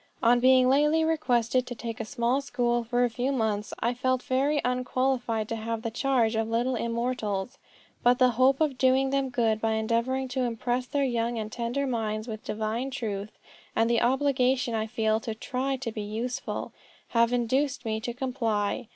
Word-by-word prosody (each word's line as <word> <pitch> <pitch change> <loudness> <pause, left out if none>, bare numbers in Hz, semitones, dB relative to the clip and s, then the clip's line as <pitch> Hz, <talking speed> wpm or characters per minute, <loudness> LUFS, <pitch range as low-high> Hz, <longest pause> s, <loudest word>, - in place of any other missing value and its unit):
On 240 +1 +5
being 255 0 +5
lately 300 +4 +3
requested 255 -6 +1
to 245 - -5
take 230 +1 -6
a 225 - -3
small 245 +2 0
school 240 -3 0
for 245 +1 +1
a 245 - +2
few 250 +4 -1
months, 220 -5 -1
I 235 +2 +1
felt 255 +1 0
very 280 +3 +1
unqualified 250 -3 0
to 230 - -2
have 225 0 -4
the 230 - -2
charge 245 -2 +1
of 225 0 0
little 240 +3 +1
immortals; 235 -2 -2 0.4
but 245 0 +4
the 255 -1 +4
hope 255 +3 +3
of 290 -5 0
doing 265 +1 +3
them 275 -1 0
good 225 -3 +1
by 225 0 +1
endeavoring 235 +4 0
to 260 +1 -2
impress 245 +1 -1
their 285 +1 0
young 235 -2 0
and 215 -1 -4
tender 240 +5 -2
minds 220 -3 -2
with 220 -2 -6
divine 220 +4 -2
truth, 215 -5 -5 0.4
and 225 - +3
the 235 - +3
obligation 260 -1 +2
I 220 -1 -1
feel 220 0 +1
to 225 0 -5
try 265 +4 -2
to 255 -3 -4
be 215 - -5
useful, 235 +6 -4 0.4
have 235 0 +3
induced 255 +2 0
me 220 -1 -1
to 240 +2 -4
comply. 235 -3 -1
245 Hz, 185 wpm, -27 LUFS, 225-260 Hz, 0.4 s, On